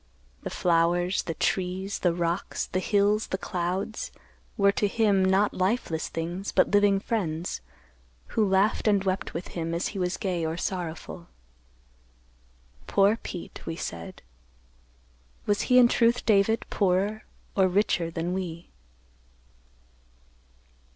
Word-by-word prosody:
The - - -4
flowers, 175 +2 +2
the 165 - -5
trees, 190 +1 -1
the 175 - +2
rocks, 170 0 -1
the 185 - -2
hills, 205 +2 +2
the 190 - -2
clouds 185 +3 -3 0.5
were 200 -1 +5
to 205 +1 +1
him, 200 -2 +2
not 190 +2 +3
lifeless 185 -4 -1
things, 175 +4 -4
but - - +3
living 205 -1 +4
friends, 180 -7 -2 0.7
who 220 - +1
laughed 195 +2 +2
and 200 -2 +3
wept 190 -3 -2
with 170 - -5
him 165 -1 -3
as 170 - -1
he 200 - -6
was 180 0 -1
gay 180 -4 -2
or 160 +1 -2
sorrowful. 170 -1 -5 1.6
"'Poor 200 +2 +4
Pete,' 180 -6 -8
we 165 - -3
said. 85 - -7 1.2
Was 205 0 +1
he 250 - +6
in 250 -1 +8
truth, 235 +1 +2
David, 215 +1 +3
poorer 200 +2 +1 0.3
or 190 -1 +4
richer 180 -3 +1
than 165 +2 -3
we?" 175 -3 -5
190 Hz, 130 wpm, -27 LUFS, 175-205 Hz, 1.6 s, in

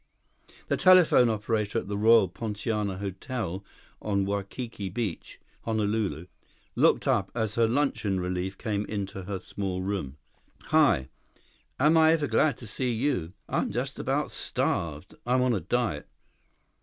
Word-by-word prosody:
The - - 0
telephone 180 -10 +6
operator 110 0 -1
at 115 - -2
the 100 - -3
Royal 110 0 +5
Poinciana 105 0 -3
Hotel 100 0 -4 0.4
on 100 -2 0
Waikiki 100 +1 -4
Beach, 105 -2 -5 0.3
Honolulu, 105 -7 -1 0.5
looked - - +3
up - - +2
as 110 -3 -1
her 115 0 +3
luncheon 115 -7 0
relief 90 +1 -3
came 105 -3 -2
into 100 -2 -4
her 100 0 -3
small 95 0 -4
room. 95 -9 -3 0.5
"Hi. 115 - +3 0.7
Am 150 +4 +5
I 160 0 +6
ever 155 -3 +1
glad 130 +2 +2
to 120 - -10
see 125 +4 -2
you! 115 - -1
I'm - - -1
just - - -3
about - - -1
starved. 80 +1 -2
I'm 125 +1 +3
on 125 -1 +2
a 105 - 0
diet. 95 -4 -1
105 Hz, 140 wpm, -27 LUFS, 95-120 Hz, 0.7 s, telephone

